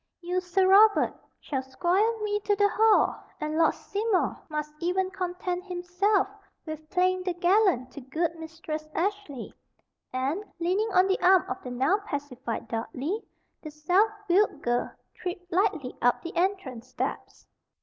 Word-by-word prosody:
You, 360 +1 -1
Sir 370 +1 +2
Robert, 415 +2 +6 0.3
shall 270 -3 -3
squire 370 - +1
me 415 0 0
to 410 0 +1
the 405 0 +3
hall, 440 0 +3 0.2
and 305 0 -3
Lord 325 0 +3
Seymour 410 -1 -1
must 300 -1 -4
even 370 +2 0
content 360 -1 -3
himself 365 +2 +1 0.4
with 310 -1 -7
playing 370 0 +2
the 365 -1 -2
gallant 355 - +3
to 285 - -9
good 320 +6 -1
Mistress 320 -1 -6
Ashley"; 365 - -3 0.6
and, 270 +10 -1 0.2
leaning 375 +6 +1
on 370 0 +5
the 385 0 0
arm 370 -1 +5
of - - -4
the 250 - -7
now 265 +11 +2
pacified 280 - -5
Dudley, 255 - -3 0.4
the 310 - -7
self 355 +8 +2 0.2
willed 390 +4 +2
girl 240 0 0 0.2
tripped 360 0 -6
lightly 345 -8 0
up 245 0 +2
the 335 - -7
entrance 335 - -1
steps. 255 - -5
355 Hz, 150 wpm, -27 LUFS, 300-390 Hz, 0.6 s, Robert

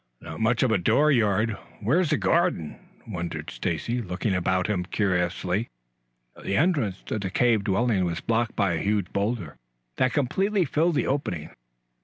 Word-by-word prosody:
"Not - - -8
much 115 +2 +2
of 130 - +2
a 110 - +3
door 150 - +3
yard. 110 -3 +2 0.2
Where's 150 - +2
the 150 - +2
garden?" 170 - +1 0.3
wondered 85 -5 -5
Stacy, 120 - -2
looking 95 +1 -2
about 95 0 +1
him 100 -4 0
curiously. 90 +1 -1 0.7
The 100 - -1
entrance 140 - +1
to 110 - -3
the 95 -2 -3
cave 115 +1 +2
dwelling 105 0 +2
was 85 -1 -1
blocked 115 0 0
by 100 -4 +1
a 80 - -1
huge 100 -3 -1
boulder, 100 -5 -2 0.4
that 130 -1 +2
completely 190 - +1
filled 155 +4 +1
the - - +1
opening. 90 - -2
110 Hz, 160 wpm, -26 LUFS, 95-130 Hz, 0.7 s, a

